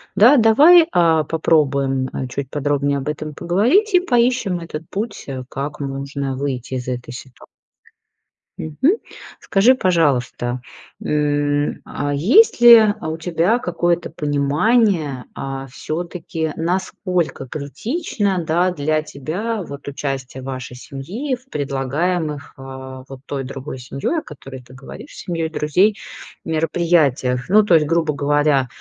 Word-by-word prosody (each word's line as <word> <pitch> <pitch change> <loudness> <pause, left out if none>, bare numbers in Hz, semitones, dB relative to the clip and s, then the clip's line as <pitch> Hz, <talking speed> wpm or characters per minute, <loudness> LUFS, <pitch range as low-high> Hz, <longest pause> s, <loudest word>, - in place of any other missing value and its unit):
да, 240 +8 +7
давай, 300 +10 +7
а, 165 -3 +3
попробуем 140 -4 +1 0.2
чуть 135 0 -5
подробнее 145 -1 0
об 140 +1 -5
этом 150 0 -4
поговорить 245 - +2
и 360 - +7
поищем 240 - +1
этот 165 -1 -8
путь, 210 +2 -5
э, 130 -2 -5
как 140 +3 -5
нужно 140 0 -4
выйти 130 -2 -4
из 125 -1 -5
этой 125 -1 -4
ситуации. 125 0 -12 1.1
Мгм, 265 - +1 0.4
скажи, 215 +7 +4
пожалуйста, 130 - 0 0.4
м, 145 -1 0
а, 145 0 -3
есть 235 - +4
ли, 235 -1 +10 0.2
а, 155 - -4
у 160 - -4
тебя 175 +6 +1
какое-то 175 -4 -1
понимание, 150 - +1
а 135 0 -5
всё-таки, 160 +2 -4
насколько 180 -3 -2
критично, 195 - -2
да, 175 +3 +2
для 155 -1 0
тебя 185 - -4
вот 140 -3 -10
участие 135 -2 -5
вашей 130 -1 -6
семьи 155 - -5
в 255 +2 -22
предлагаемых, 150 +3 -2
а, 130 0 -9
вот 135 -1 -11
той 135 -1 -4
другой 135 0 -7
семьей, 135 - -2
о - - -8
которой 135 -4 -11
ты 125 +1 -17
говоришь, 135 - -11
семьей 165 -3 -3
друзей, 180 +7 +2 0.5
мероприятиях. 155 -6 +1
Ну 215 +2 +6
то 195 -4 +2
есть, 150 -2 +3
грубо 165 -2 +1
говоря, 145 -2 +2
150 Hz, 130 wpm, -20 LUFS, 135-180 Hz, 1.1 s, ли